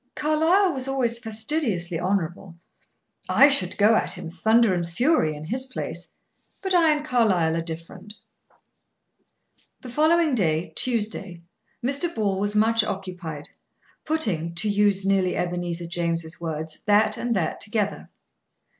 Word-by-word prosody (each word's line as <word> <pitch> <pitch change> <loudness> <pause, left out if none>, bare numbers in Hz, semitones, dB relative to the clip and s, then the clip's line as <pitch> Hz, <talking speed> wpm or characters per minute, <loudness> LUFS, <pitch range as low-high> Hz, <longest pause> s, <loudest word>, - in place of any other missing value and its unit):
Carlyle 320 +5 +2
was 265 -1 -3
always 245 -4 0
fastidiously 220 - -2
honorable. 180 -1 -2 0.7
I 280 - +6
should 190 -10 0
go 215 +2 +5
at - - +1
him, 165 - -7
thunder 220 +3 +3
and 175 -1 -1
fury, 210 - +1
in 150 +1 -8
his 260 +9 -2
place; 260 - -6 0.5
but 380 -1 -1
I 335 -3 +5
and 300 0 -1
Carlyle 195 - +2
are 165 - -1
different." 165 +5 -8 1.7
The 255 - -9
following 315 +2 +3
day, 165 -6 0
Tuesday, 210 -7 -1 0.4
Mr. 280 +6 +1
Ball 200 -3 0
was 205 +1 -1
much 225 +1 +3
occupied, 180 -7 -6 0.5
putting, 180 - -1
to 180 +6 +1
use 200 -1 +2
nearly 195 -2 +1
Ebenezer 175 -1 -3
James' 170 -1 -3
words, 160 -1 -5
that 210 +1 +4
and 240 -1 -2
that 170 -5 -2
together. 210 -1 -2
205 Hz, 135 wpm, -24 LUFS, 170-250 Hz, 1.7 s, I